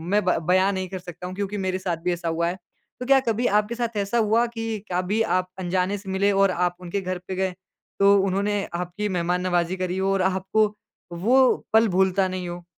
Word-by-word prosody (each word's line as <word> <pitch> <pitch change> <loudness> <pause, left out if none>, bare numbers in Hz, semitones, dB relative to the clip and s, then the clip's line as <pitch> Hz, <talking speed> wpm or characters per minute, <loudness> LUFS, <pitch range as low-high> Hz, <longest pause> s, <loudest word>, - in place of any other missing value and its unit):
मैं 210 - +3
ब 180 - +2
बयान 185 +2 +3
नहीं 185 0 -3
कर 190 - -5
सकता 180 0 -8
हूँ 185 - -7
क्योंकि 200 +1 -3
मेरे 190 -1 -1
साथ 180 -3 -2
भी 180 - +1
ऐसा 175 0 -5
हुआ 165 +1 0
है। 175 +2 -3 0.4
तो 250 - -4
क्या 270 +1 +5
कभी 230 +2 +1
आपके 210 +3 +1
साथ 235 -2 -3
ऐसा 200 +3 0
हुआ 225 +2 +3
कि 225 0 -3 0.3
कभी 185 +5 0 0.2
आप 185 - -1
अनजाने 185 +2 0
से 195 -1 -10
मिले 200 +2 +2
और 195 -1 +3
आप 180 0 0
उनके 180 +3 -3
घर 185 0 -3
पे 190 - -4
गए, 190 -1 -1 0.5
तो 200 0 +6
उन्होंने 200 +1 0
आपकी 180 +4 -3
मेहमान-नवाज़ी 180 0 0
करी 185 0 -2
हो 190 +1 +1
और 195 - +1
आपको 190 +3 +1 0.6
वो 260 +3 +6 0.3
पल 225 0 +6
भूलता 190 0 +3
नहीं 185 -1 -4
हो? 175 0 -7
190 Hz, 215 wpm, -24 LUFS, 180-205 Hz, 0.6 s, तो